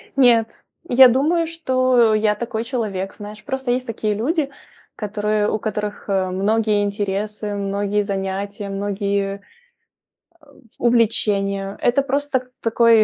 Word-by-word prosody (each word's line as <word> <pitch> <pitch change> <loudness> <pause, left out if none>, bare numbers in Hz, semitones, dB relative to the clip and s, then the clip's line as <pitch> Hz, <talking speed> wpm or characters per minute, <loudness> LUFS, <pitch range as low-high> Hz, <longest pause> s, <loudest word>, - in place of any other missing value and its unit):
Нет, 235 -4 +3 0.2
я 260 +1 +8
думаю, 315 +7 +2
что, 255 -8 +2
я 215 -1 +2
такой 230 0 -3
человек. 215 -6 -3
Знаешь, 210 +1 -9
просто 265 -2 -2
есть 250 +1 0
такие 220 -2 -2
люди, 280 - 0 0.5
которые 210 0 -1
у 215 - -1
которых, 210 -1 -4
э, 190 -1 +1
многие 210 +2 +1
интересы, 205 +1 -3
многие 200 +1 -1
занятия, 200 +1 -3
э, - - -6
многие 200 0 -2 1.4
увлечения. 200 -4 +1
Это 245 +3 +3
просто 275 -1 -1
такой, 230 -1 +5
215 Hz, 120 wpm, -21 LUFS, 200-245 Hz, 1.4 s, я